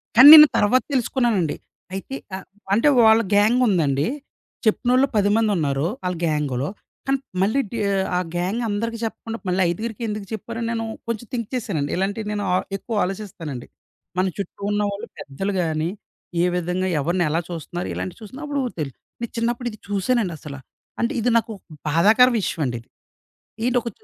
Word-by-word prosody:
కానీ 255 Hz, +4 st, +10 dB
నేను 305 Hz, -1 st, +11 dB
తర్వాత 245 Hz, +5 st, +3 dB
తెలుసుకున్నానండి. 235 Hz, -, +1 dB, 0.4 s
అయితే 195 Hz, +8 st, -5 dB, 0.2 s
ఆహ్, 190 Hz, -, -8 dB, 0.3 s
అంటే 230 Hz, +8 st, +3 dB, 0.2 s
వాళ్ళ 220 Hz, +1 st, +6 dB
గ్యాంగుందండి. 205 Hz, -, +3 dB, 0.6 s
చెప్పినోళ్ళు 250 Hz, +5 st, +3 dB
10 205 Hz, -1 st, +3 dB
మందున్నారు 165 Hz, -10 st, +1 dB, 0.2 s
ఆళ్ళ 180 Hz, 0 st, -1 dB
గ్యాంగ్‌లో. 150 Hz, -4 st, -1 dB, 0.4 s
కానీ 270 Hz, 0 st, +2 dB, 0.2 s
మళ్ళీ 215 Hz, +8 st, +2 dB
డీ 230 Hz, -, -4 dB, 0.2 s
ఆహ్, 190 Hz, 0 st, 0 dB
ఆ -, -, +2 dB, 0.2 s
గ్యాంగ్ 185 Hz, +7 st, -1 dB
అందరికి 230 Hz, +3 st, -2 dB
చెప్పకుండా 225 Hz, 0 st, -4 dB
మళ్ళీ 185 Hz, +1 st, +1 dB
ఐదుగురికెందుకు 215 Hz, +2 st, -4 dB
చెప్పారని 230 Hz, +2 st, -4 dB
నేను 225 Hz, -1 st, -2 dB, 0.2 s
కొంచెం 230 Hz, 0 st, -4 dB
థింక్ 230 Hz, -3 st, -2 dB
చేసానండి. 165 Hz, -, -2 dB
ఇలాంటియి 200 Hz, +3 st, -2 dB
నేను 205 Hz, -1 st, -2 dB
ఆహ్, 185 Hz, -, +1 dB
ఎక్కువ 225 Hz, +3 st, -5 dB
ఆలోచిస్తానండి. 180 Hz, -, -5 dB, 0.5 s
మన 185 Hz, -, +2 dB
చుట్టూ 200 Hz, 0 st, -6 dB
ఉన్న 205 Hz, 0 st, +1 dB
వాళ్ళు 200 Hz, +1 st, -6 dB
పెద్దలు 195 Hz, +9 st, -4 dB
గాని, 160 Hz, -1 st, -1 dB, 0.5 s
ఏ -, -, +4 dB
విధంగా 180 Hz, +1 st, -1 dB
ఎవరిని 170 Hz, +5 st, +1 dB
ఎలా 160 Hz, +2 st, +1 dB
చూస్తన్నారు, 175 Hz, +1 st, -5 dB
ఇలాంటివి 185 Hz, -, -5 dB
చూస్తున్న 260 Hz, +8 st, -9 dB
అప్పుడు 285 Hz, -1 st, -1 dB, 0.2 s
తెలు 145 Hz, -3 st, -2 dB, 0.3 s
నేను 235 Hz, -, -4 dB
చిన్నప్పుడు 235 Hz, +1 st, -1 dB
ఇది 215 Hz, -, -11 dB
చూసానండసల. 195 Hz, -, -1 dB, 0.4 s
అంటే 235 Hz, -, 0 dB
ఇది 235 Hz, +2 st, +1 dB
నాకు 230 Hz, 0 st, -1 dB
ఒక -, -, -27 dB, 0.3 s
బాధాకర 215 Hz, -, +5 dB
విషయండిది. 125 Hz, -, -3 dB, 0.8 s
ఏంటొక 245 Hz, -1 st, +1 dB
205 Hz, 150 wpm, -22 LUFS, 175-230 Hz, 0.8 s, నేను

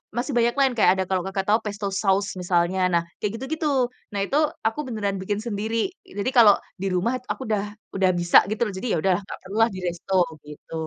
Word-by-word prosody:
masih 250 Hz, +4 st, -2 dB
banyak 235 Hz, 0 st, +3 dB
lain, 265 Hz, -2 st, +4 dB
kayak 220 Hz, -, +5 dB
ada 190 Hz, -, +2 dB
kalau 185 Hz, -2 st, 0 dB
Kakak 195 Hz, 0 st, -3 dB
tahu 215 Hz, +2 st, +4 dB
pesto 205 Hz, -1 st, -3 dB
sauce 200 Hz, 0 st, +2 dB
misalnya, 175 Hz, +1 st, +1 dB
nah 170 Hz, -, +4 dB, 0.2 s
kayak 210 Hz, -, -1 dB
gitu-gitu. 310 Hz, +4 st, -2 dB, 0.4 s
Nah 205 Hz, -, -3 dB
itu 275 Hz, -, -3 dB, 0.3 s
aku 225 Hz, +6 st, -2 dB
beneran 205 Hz, -4 st, -2 dB
bikin 205 Hz, +2 st, -2 dB
sendiri. 220 Hz, +1 st, -3 dB, 0.4 s
Jadi 205 Hz, +5 st, 0 dB
kalau 215 Hz, -4 st, +9 dB, 0.3 s
di 195 Hz, -, -1 dB
rumah 185 Hz, +7 st, +1 dB, 0.2 s
aku -, -, -5 dB
udah 210 Hz, -2 st, 0 dB, 0.3 s
udah 190 Hz, -1 st, +3 dB
bisa 175 Hz, 0 st, +5 dB
gitu 215 Hz, -, -3 dB
loh, 200 Hz, -, -5 dB
jadi 245 Hz, -, -4 dB
ya -, -, +2 dB
udahlah 190 Hz, 0 st, +2 dB
gak -, -, -7 dB
perlu 195 Hz, -, -7 dB
lah 225 Hz, -, +3 dB
di 185 Hz, -, -5 dB
resto, 175 Hz, +2 st, -4 dB, 0.3 s
gitu. 150 Hz, +2 st, -12 dB
200 Hz, 215 wpm, -24 LUFS, 190-225 Hz, 0.4 s, kalau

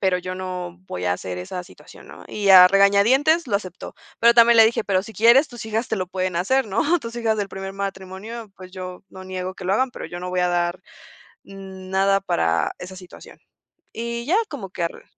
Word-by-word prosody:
pero 190 Hz, -2 st, +1 dB
yo 185 Hz, 0 st, -6 dB
no 180 Hz, -1 st, -6 dB
voy 90 Hz, -, -5 dB
a 90 Hz, -, +2 dB
hacer 90 Hz, 0 st, -6 dB
esa 180 Hz, -, -6 dB
situación", -, -, -16 dB
¿no? -, -, -12 dB
Y 205 Hz, -2 st, 0 dB
a 180 Hz, -1 st, +10 dB
regañadientes 230 Hz, -, +4 dB
lo 205 Hz, -, +1 dB
aceptó. 185 Hz, -3 st, -8 dB, 0.3 s
Pero 235 Hz, +1 st, +6 dB
también 235 Hz, 0 st, +6 dB
le 225 Hz, -, +9 dB
dije: 225 Hz, -1 st, -1 dB
"Pero 190 Hz, -2 st, +1 dB
si 220 Hz, -, -11 dB
quieres, 240 Hz, +7 st, +5 dB
tus 240 Hz, -4 st, -9 dB
hijas 220 Hz, +2 st, -2 dB
te 220 Hz, -, -1 dB
lo 185 Hz, -, -3 dB
pueden 185 Hz, -2 st, -2 dB
hacer, 260 Hz, +9 st, +1 dB
¿no?, 290 Hz, -, +1 dB
tus 230 Hz, -2 st, -8 dB
hijas 225 Hz, -2 st, 0 dB
del 200 Hz, -1 st, -2 dB
primer 195 Hz, 0 st, -7 dB
matrimonio, 195 Hz, +3 st, -7 dB
pues 185 Hz, -1 st, -12 dB
yo 185 Hz, -1 st, -8 dB
no 190 Hz, 0 st, -11 dB
niego 185 Hz, 0 st, -5 dB
que 190 Hz, -, -10 dB
lo 185 Hz, -, 0 dB
hagan, 260 Hz, +3 st, +1 dB
pero -, -, -8 dB
yo 175 Hz, 0 st, -8 dB
no 180 Hz, -, -5 dB
voy 180 Hz, 0 st, 0 dB
a 180 Hz, -, +2 dB
dar 175 Hz, 0 st, -1 dB, 0.6 s
nada 195 Hz, 0 st, -1 dB
para 85 Hz, -, 0 dB
esa 185 Hz, +1 st, -9 dB
situación". 180 Hz, -1 st, -14 dB, 0.6 s
Y 235 Hz, +1 st, -4 dB
ya 355 Hz, +7 st, +2 dB
como 235 Hz, -10 st, -7 dB
que 180 Hz, -, -5 dB
ar 170 Hz, -, -6 dB
195 Hz, 215 wpm, -22 LUFS, 185-225 Hz, 0.6 s, a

